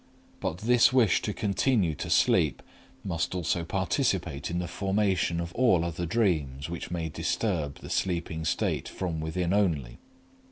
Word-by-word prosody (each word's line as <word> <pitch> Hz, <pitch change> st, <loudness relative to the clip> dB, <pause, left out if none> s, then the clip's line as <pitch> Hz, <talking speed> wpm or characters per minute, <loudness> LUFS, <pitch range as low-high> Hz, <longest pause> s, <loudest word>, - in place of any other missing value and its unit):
But 80 Hz, -, -3 dB
this 120 Hz, +2 st, +5 dB
wish 120 Hz, -8 st, +4 dB
to 105 Hz, -, -2 dB
continue 100 Hz, -, +1 dB
to -, -, -6 dB
sleep -, -, +3 dB, 0.4 s
must 90 Hz, -1 st, -2 dB
also 85 Hz, -1 st, 0 dB
participate 95 Hz, -, -1 dB
in 85 Hz, -, -2 dB
the 90 Hz, 0 st, -2 dB
formation 95 Hz, -1 st, 0 dB
of 85 Hz, 0 st, -4 dB
all 115 Hz, -10 st, +3 dB
other 85 Hz, 0 st, -3 dB
dreams 80 Hz, -, 0 dB
which 85 Hz, -, -5 dB
may 85 Hz, -2 st, -2 dB
disturb 80 Hz, -1 st, -1 dB
the -, -, -9 dB
sleeping 85 Hz, -3 st, -1 dB
state 80 Hz, -, -1 dB
from 85 Hz, -4 st, -3 dB
within 85 Hz, +3 st, -1 dB
only. 80 Hz, -12 st, 0 dB
85 Hz, 150 wpm, -28 LUFS, 80-100 Hz, 0.4 s, this